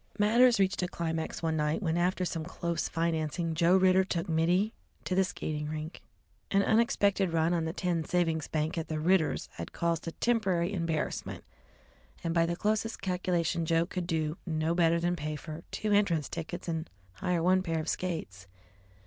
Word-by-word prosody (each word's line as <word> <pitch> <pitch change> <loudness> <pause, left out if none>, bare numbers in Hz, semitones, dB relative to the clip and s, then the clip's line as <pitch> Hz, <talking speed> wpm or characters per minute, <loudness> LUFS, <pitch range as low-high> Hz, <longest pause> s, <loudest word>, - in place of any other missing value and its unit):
Matters 230 +2 +5
reached 195 0 +2
a 180 - 0
climax 165 -2 -3
one 160 -1 +1
night 150 +5 0
when, 165 -2 0
after 180 +1 +1
some 165 -2 -3
close 170 -1 -3
financing, 165 0 -1
Joe 170 +3 +4
Ridder 185 0 +5
took 170 -3 -2
Mittie 175 +6 +2 0.3
to - - -2
the 190 +1 +4
Skating 150 -4 -4
Rink. 155 +2 -6 0.5
An 200 0 +3
unexpected 200 -4 +2
run 165 +1 +2
on 165 -2 0
the 160 - -1
tin 175 -1 -1
savings 165 -2 0
bank 155 +2 -1
at 160 - -4
the 155 -1 -2
Ridders' 170 0 +2
had - - -6
caused 170 -1 -1
a - - -2
temporary 195 -6 +1
embarrassment, 165 -4 -2 0.8
and 165 -1 -1
by 165 -1 +3
the 170 - -1
closest 215 +4 -1
calculation 180 -3 0
Joe 165 +1 +2
could 180 -1 -4
do 155 -1 -1
no 160 -1 0
better 170 -1 +3
than 175 +1 0
pay 155 -1 -4
for 155 +2 -7
two 215 - -2
entrance 185 -8 +2
tickets 170 +2 -6
and 160 -1 -3 0.2
hire 170 - -1
one 185 +1 +4
pair 165 -3 -2
of 155 - -4
skates. 105 - -3
170 Hz, 180 wpm, -30 LUFS, 160-185 Hz, 0.8 s, Matters